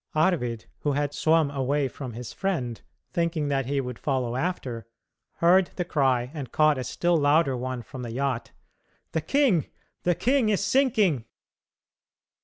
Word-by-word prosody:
Arvid, 145 -9 +1
who 145 - 0
had 145 0 -1
swum 160 -2 +3
away 140 +1 0
from 130 -1 -7
his 120 +1 -7
friend, 130 - -2 0.3
thinking 170 -3 0
that 135 -3 0
he 140 0 0
would 125 -3 -5
follow 130 -4 -1
after, 130 -7 -3 0.5
heard 180 +2 +4
the 180 - -2
cry 130 -6 +1
and 140 -6 -6
caught 155 -3 +3
a - - -2
still 175 +8 +1
louder 145 -2 +3
one 125 0 -4
from 130 +4 -9
the 120 -2 -5
yacht: 130 -1 -2 0.6
"The 160 - 0
king, 220 - +2 0.3
the 175 -1 +2
king 255 - +2
is 200 -1 +1
sinking!" 205 - +2
145 Hz, 155 wpm, -26 LUFS, 125-170 Hz, 0.6 s, heard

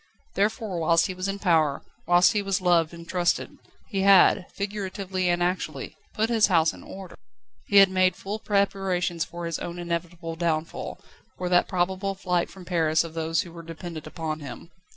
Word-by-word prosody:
Therefore, 205 -2 -1
whilst 165 +1 +3
he 185 - -3
was 185 +1 -4
in 195 0 -2
power, 160 -7 +2 0.2
whilst 175 +1 +6
he 210 - +1
was 195 -2 0
loved 175 -3 +3
and 170 -1 -11
trusted, 175 -1 -1 0.3
he 195 -4 -2
had, 195 -2 +6
figuratively 195 -2 -3
and 175 0 +1
actually, 165 -6 -3 0.2
put 220 +1 +1
his 225 -2 +4
house 165 -4 +3
in - - -12
order. 190 -2 -10 0.5
He 200 - +3
had 195 -1 +8
made 185 -1 +3
full 205 +4 -5
preparations 195 -5 0
for 170 +1 -7
his 170 -1 -3
own 175 0 -6
inevitable 170 -1 -4
downfall, 165 -1 -2 0.4
for 180 -1 -3
that 180 0 +4
probable 190 +1 -1
flight 180 -2 -1
from 190 -2 -12
Paris 160 -3 +2
of 165 -1 -8
those 165 0 0
who 175 - -9
were 170 0 -9
dependent 165 -1 -8
upon 155 -1 -4
him. 145 +4 -9
175 Hz, 180 wpm, -26 LUFS, 165-195 Hz, 0.5 s, had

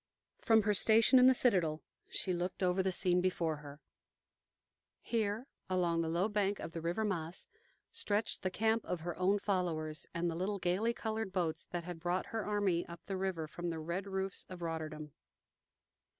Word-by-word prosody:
From 225 -1 +4
her 210 0 +2
station 225 +5 +6
in 250 - +8
the 260 - +7
citadel 175 -11 +2 0.3
she 185 - -1
looked 180 +2 -2
over 180 +1 +2
the 190 0 +1
scene 180 -1 +4
before 170 -4 0
her. 145 0 -11 1.2
Here, 220 0 -1 0.2
along 175 -2 +1
the 165 - -1
low 175 +5 +1
bank 205 -2 0
of - - -6
the 165 -1 -5
river 175 +7 -1
Maas, 170 -4 -3 0.4
stretched 220 - -1
the 185 - 0
camp 220 +3 +1
of 180 -3 -3
her 175 +1 -4
own 190 +3 +3
followers, 165 -7 -2
and 170 +1 -1
the 170 - -1
little 195 +4 -1
gayly 190 +5 +1
colored 220 -3 -3
boats 170 -4 -1
that 175 -1 -4
had 175 -1 -7
brought 175 +2 -1
her 225 -1 -1
army 200 -5 +1
up 170 -1 -10
the 195 - -4
river 185 -4 -2
from 175 +3 -5
the 165 - -3
red 170 +5 -3
roofs 190 -1 -2
of 180 -2 -8
Rotterdam. 155 -2 -4
180 Hz, 180 wpm, -34 LUFS, 170-205 Hz, 1.2 s, in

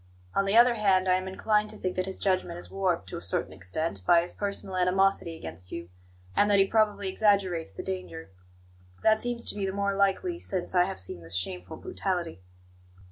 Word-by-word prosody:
On 195 - +2
the 200 +3 +3
other 240 +1 +7
hand, 195 -4 +2
I 185 - +5
am 185 0 0
inclined 210 +2 +1
to 215 - -3
think 185 -2 -3
that 185 0 -1
his 190 - -4
judgment 185 -3 0
is 175 - -9
warped, 185 - 0
to - - -5
a - - -7
certain - - -2
extent, 95 - -4
by 170 - +5
his 175 - -4
personal 200 -2 -3
animosity 185 -1 +2
against 90 - -10
you, 85 0 -6 0.5
and 205 - +4
that 205 - +5
he 195 - +6
probably 210 -1 +1
exaggerates 190 - +1
the 95 - -7
danger. 90 -2 -6 0.7
That 220 0 +4
seems 240 -1 0
to - - -11
me 200 -2 -2
the - - -1
more 200 0 -1
likely 200 - +1
since 185 - -3
I 180 -1 +5
have 195 - -5
seen 90 -2 -3
this 85 +1 -7
shameful 90 -1 -3
brutality." 175 - -3
185 Hz, 205 wpm, -28 LUFS, 165-200 Hz, 0.7 s, other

